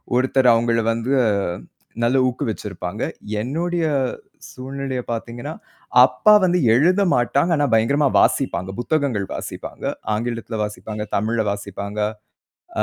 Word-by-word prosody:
ஒருத்தர் 130 0 +3
அவுங்கள 115 0 +2
வந்து 115 +3 -2 0.9
நல்ல 125 +3 +3
ஊக்கு 125 - -3
வச்சிருப்பாங்க. 100 -2 -5 0.4
என்னுடைய 165 +7 -1 0.7
சூழ்நிலையப் 130 -1 -5
பார்த்தீங்கன்னா, 120 +6 -5 0.5
அப்பா 130 +11 +4
வந்து 180 0 +2 0.2
எழுத 180 +9 +3
மாட்டாங்க. 140 +7 +1
ஆனா 145 - +2
பயங்கரமா 140 +6 +3
வாசிப்பாங்க. 95 -8 +1
புத்தகங்கள் 125 -7 0
வாசிப்பாங்க. - - -7 0.3
ஆங்கிலத்துல 115 0 -3
வாசிப்பாங்க. 105 0 -5
தமிழ்ல 110 +2 0
வாசிப்பாங்க. 100 +1 -6 0.8
ஆ, - - +5
120 Hz, 110 wpm, -21 LUFS, 110-140 Hz, 0.9 s, ஆ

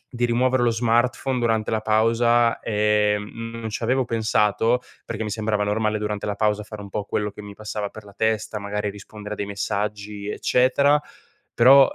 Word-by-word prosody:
di 120 - -2
rimuovere 125 +1 +2
lo 120 - +4
smartphone 120 +3 +1
durante 115 -2 0
la 110 -1 0
pausa, 115 +2 +3
ehm, 105 +1 0
non 110 -1 -4
ci 110 - -4
avevo 130 +2 +2
pensato 115 +1 +1 0.2
perché 110 -1 -4
mi 105 - -3
sembrava 105 -1 -1
normale 110 +1 0
durante 105 -1 -3
la 105 -1 -2
pausa 105 0 +1
fare 105 0 -9
un 100 - -9
po' 105 +1 -3
quello 105 +1 -2
che 105 - -10
mi 105 -1 -9
passava 105 0 -4
per 110 0 -12
la 100 - -14
testa, 110 -1 0
magari 105 +1 -3
rispondere 105 +1 -8
a - - -7
dei 100 - -2
messaggi, 100 0 -3
eccetera; 140 +6 +3 0.5
però 135 +3 +7
110 Hz, 180 wpm, -23 LUFS, 105-115 Hz, 0.5 s, però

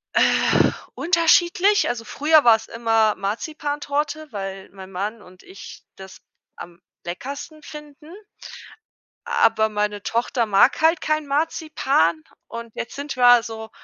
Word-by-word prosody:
Äh, - - +3 0.2
unterschiedlich, 350 +4 +3
also 240 -1 -3
früher 300 +6 +3
war 230 -2 +7
es 220 - -7
immer 225 -2 +1
Marzipantorte, 295 +6 -4
weil 195 -2 -7
mein 190 0 -12
Mann 205 +4 -5
und 180 -1 -18
ich 375 +2 -12
das 190 0 -13 0.3
am 170 0 -12 0.2
leckersten 280 - -7
finden. 300 +1 -12 1.2
Aber 220 -1 +2
meine 210 -1 -2
Tochter 235 +1 -1
mag 210 +7 +3
halt 320 0 +3
kein 310 -1 -1
Marzipan 275 - 0 0.2
und 230 -1 -9
jetzt 235 - -6
sind 285 +1 -6
wir 245 -2 +6
so 220 -1 -8
235 Hz, 125 wpm, -22 LUFS, 210-305 Hz, 1.2 s, war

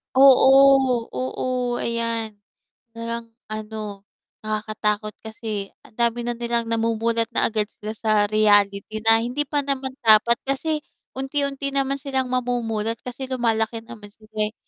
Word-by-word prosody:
Oo, 270 -2 +6
oo, 130 - -4 0.4
ayan 230 -1 -1 0.7
nalang 230 0 -4 0.2
ano, 215 -2 -6 0.4
nakakatakot 215 0 -2
kasi 215 -2 -5
ang - - -19
dami 235 0 +1
na 240 - -1
nilang 235 -1 -1
namumulat 230 0 +1
na - - +2
agad 215 -1 0 0.2
sila 215 +1 -4
sa 220 -1 -1 0.2
reality 205 0 +2
na 225 0 +7
hindi 250 +5 -2
pa 290 0 0
naman 265 -1 -2
dapat. 220 +2 +6
Kasi 300 +3 -1 0.4
unti-unti 275 0 -2
naman 275 0 0
silang 265 -3 -2
mamumulat 230 -3 -1
kasi 250 +2 -6
lumalaki 225 -2 0
naman 215 -4 -11
sila, 215 -1 -4
eh. - - -21
230 Hz, 130 wpm, -23 LUFS, 215-260 Hz, 0.7 s, na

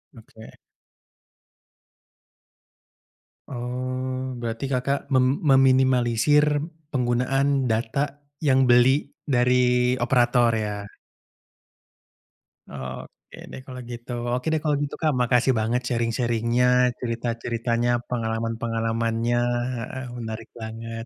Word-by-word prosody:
Oke. 110 -1 -14 2.9
Oh. 130 +1 -4
Berarti 120 +2 -4
Kakak 135 +1 -1
mem 130 +2 +2
meminimalisir 135 - +3 0.3
penggunaan 135 +2 +1
data 135 +6 -1 0.2
yang 135 -3 +4
beli 125 +4 +4 0.2
dari 125 -1 +2
operator, 120 -1 +3
ya? 105 -2 -2 1.8
Oke 65 -2 -9
deh, - - -7
kalau 130 -2 -8
gitu. 120 +1 -8 0.2
Oke 125 +4 -2
deh, 155 - 0
kalau 150 -1 +2
gitu, 140 - -4
Kak. 155 -2 +3
Makasih 125 +1 +3
banget 115 +3 0
sharing-sharing-nya, 115 0 +1 0.3
cerita-ceritanya, 115 0 -2 0.2
pengalaman-pengalamannya, 115 0 -1 0.4
heeh, 130 +3 -6
menarik 110 -1 -6
banget. 115 +1 -6
125 Hz, 85 wpm, -24 LUFS, 115-130 Hz, 2.9 s, yang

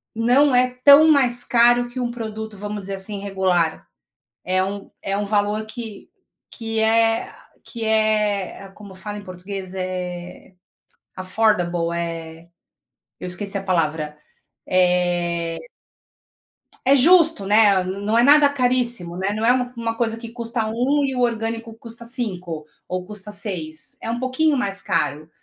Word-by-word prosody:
não 250 +5 +3
é 250 0 +4
tão 295 +3 +8
mais 245 -4 +3
caro 240 0 +4
que 250 +1 -7
um 240 -1 -2
produto, 220 -2 -6
vamos 205 +1 -5
dizer 195 +1 -5
assim, 195 +1 -2
regular, 185 -5 0 0.6
é 185 +1 +1
um 200 +1 -6
é 195 0 -1
um 205 - -1
valor 210 +1 0
que 220 -2 -9 0.4
que 225 -2 -3
é 225 0 +2 0.3
que 230 -2 -6
é, 210 -3 0
como 200 -2 -12
fala 205 +2 -7
em 205 - -10
português, 185 0 -7
é, 180 0 -6 0.6
affordable, 185 -3 0
eh, 165 -1 -6 0.7
eu - - -7
esqueci 195 +3 -2
a - - -6
palavra. 155 -4 -1 0.5
Eh 175 -2 +1 1.3
é 275 +2 +6
justo, 325 - +5
né. 205 -2 +5
N 190 +2 -5
não 220 +2 +2
é 235 - +5
nada 285 +1 +6
caríssimo, 245 -9 0
né. 195 +2 -1
Não 220 +1 -2
é 245 - +5 0.2
uma 230 -1 -2
coisa 225 -1 -1
que 230 0 -8
custa 235 -1 -3
1 265 +6 +1
e 265 -1 -3
o 250 - -1
orgânico 230 -1 -2
custa 230 +1 -9
5 180 - -4 0.2
ou 185 0 -4
custa 210 0 -7
6, 180 -7 -3
é - - -5
um 235 - -3
pouquinho 275 +4 +1
mais 200 -5 -1
caro. 150 +3 -2
210 Hz, 150 wpm, -21 LUFS, 185-235 Hz, 1.3 s, tão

